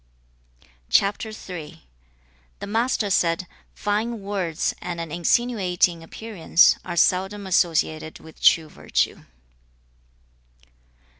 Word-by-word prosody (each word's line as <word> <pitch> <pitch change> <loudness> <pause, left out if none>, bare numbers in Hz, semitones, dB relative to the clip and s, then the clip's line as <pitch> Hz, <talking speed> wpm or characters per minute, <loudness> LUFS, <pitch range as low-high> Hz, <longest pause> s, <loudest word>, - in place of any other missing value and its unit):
The 190 -6 -4 0.9
Master 225 -1 0
said, 170 -1 +1 0.3
'Fine 215 +2 -2
words 185 -5 -2
and 175 -1 -5
an 165 -2 -5
insinuating 180 -1 +1
appearance 180 -1 +2
are 175 -1 -5
seldom 190 +4 +2
associated 160 -3 0
with 160 - -15
true 165 -3 +5
virtue.' - - -2
180 Hz, 80 wpm, -23 LUFS, 165-205 Hz, 0.9 s, true